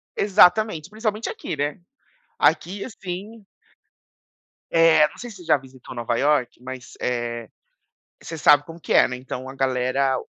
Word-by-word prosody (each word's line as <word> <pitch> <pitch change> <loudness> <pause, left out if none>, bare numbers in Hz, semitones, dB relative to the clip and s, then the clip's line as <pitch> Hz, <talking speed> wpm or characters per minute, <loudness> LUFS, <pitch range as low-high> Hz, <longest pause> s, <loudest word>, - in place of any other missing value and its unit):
Exatamente, 195 -3 +4
principalmente 215 0 -3
aqui, - - -5
né? 145 +1 -2 0.6
Aqui, 195 +3 +1
assim 205 +1 -8 1.3
É, 165 -2 +5
não - - -17
sei 245 - -7
se 205 - -11
você 175 - -13
já 160 - +4
visitou 130 -2 -13
Nova 120 0 -1
Iorque, 140 -5 +1
mas, 130 0 -9
eh, 120 -1 -3 0.7
você 165 - -7
sabe 145 -1 +5
como 165 +3 -11
que 160 - -3
é, - - +7
né? 125 - -5
Então, 130 0 -7
a 135 - -9
galera 130 0 +1
150 Hz, 150 wpm, -23 LUFS, 130-185 Hz, 1.3 s, é